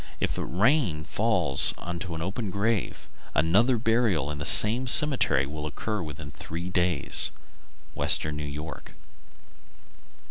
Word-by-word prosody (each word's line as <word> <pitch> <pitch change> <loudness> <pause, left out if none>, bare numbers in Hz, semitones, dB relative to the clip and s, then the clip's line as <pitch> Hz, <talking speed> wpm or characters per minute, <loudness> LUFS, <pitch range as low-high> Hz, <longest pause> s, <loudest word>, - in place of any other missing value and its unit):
If - - -2
rain 100 - 0
falls 90 -8 +2
into 85 0 -6
an 80 - -5
open 100 +4 -5
grave, 100 +2 -3 0.3
another 100 - +2
burial 110 - 0
in 75 - -7
the 70 - -6
same 120 +5 +4
cemetery 125 - +5
will 75 +2 -7
occur 105 +6 -5
within 75 -2 -9
three 85 +4 -8
days. 90 -5 0 0.7
_Western 75 - +2
New 75 0 -6
York. 75 +2 -9
90 Hz, 120 wpm, -25 LUFS, 75-110 Hz, 0.7 s, cemetery